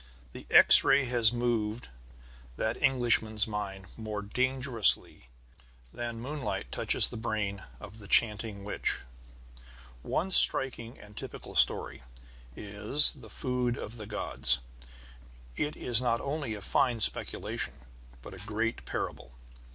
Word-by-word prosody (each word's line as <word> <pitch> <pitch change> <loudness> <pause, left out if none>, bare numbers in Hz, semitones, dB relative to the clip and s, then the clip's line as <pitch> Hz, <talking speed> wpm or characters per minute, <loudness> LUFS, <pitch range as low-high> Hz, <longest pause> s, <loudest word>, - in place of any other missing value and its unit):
The - - -12
X - - +6
ray 140 - +3
has 120 -3 +2
moved 120 -2 -3 0.7
that 110 +1 -2
Englishman's 120 -5 +1
mind 100 -3 -6
more 105 -2 -6
dangerously 125 - +2 0.7
than 120 -1 -6
moonlight 135 -2 -6
touches - - +2
the 120 - -9
brain 105 -3 -4 0.2
of 105 +3 -11
the 100 - -13
chanting 105 -2 0
witch. 100 - -4 1.0
One 185 - -3
striking 125 -7 +5
and 105 0 -16
typical - - -10
story - - -1 0.5
is 105 +8 +4
The - - -15
Food 125 -2 -1
of 115 +3 -8
the 105 -2 -9
Gods. 105 - -2 1.0
It 150 +1 -3
is 120 -1 0
not 115 -2 0
only 140 -6 -5
a 105 - -10
fine 120 +2 0
speculation, 105 - +1 0.5
but - - -11
a - - -11
great 110 +2 -4
parable. - - -6
115 Hz, 125 wpm, -28 LUFS, 105-125 Hz, 1.0 s, X